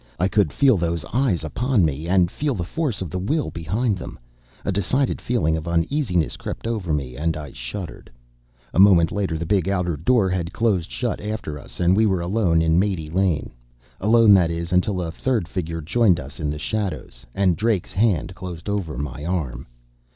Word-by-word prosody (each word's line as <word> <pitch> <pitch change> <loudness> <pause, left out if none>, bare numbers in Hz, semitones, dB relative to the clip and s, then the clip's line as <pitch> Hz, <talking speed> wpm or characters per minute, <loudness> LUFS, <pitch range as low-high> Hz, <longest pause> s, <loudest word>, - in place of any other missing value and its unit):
I 90 - +2
could 100 -6 +2
feel 130 - +4
those 85 -2 -1
eyes 120 -10 +1
upon 110 - +1
me, 75 +2 -2
and 90 -1 +3
feel 145 -3 -1
the 90 - -2
force 125 - -2
of 85 - -7
the 95 - -2
will 145 - -1
behind 100 +5 -1
them. - - -8 0.5
A - - +1
decided 125 +8 0
feeling 115 -10 +1
of 80 +1 -5
uneasiness 90 - 0
crept - - -6
over 110 -8 -2
me, 70 -4 -2
and 80 +3 -1
I 75 -3 -7
shuddered. 75 +8 -7 0.6
A - - +1
moment 90 -5 +6
later 95 -6 -1
the 85 - -3
big 95 0 +1
outer 90 -4 0
door 100 - +2
had 90 -1 -2
closed 100 -7 +1
shut 120 -3 -3
after 105 -8 -4
us, - - -11
and 90 +1 +4
we 110 +1 +4
were 95 -3 +1
alone 85 -3 +2
in 80 +1 +3
Mate 90 -6 -1
Lane. 90 -5 +1 0.5
Alone, 110 +1 +6
that 90 -4 +5
is, 85 +1 -3
until 90 0 +1
a 80 - -4
third 110 0 -1
figure 85 -2 -4
joined 90 +2 +3
us 70 +1 -8
in 75 - -1
the 75 - -3
shadows, 75 - -4
and 95 -3 +3
Drake's 105 -2 0
hand 95 -3 +1
closed 90 -2 -8
over 95 -10 -2
my 70 0 -5
arm. 80 -7 -3
90 Hz, 195 wpm, -22 LUFS, 80-105 Hz, 0.6 s, moment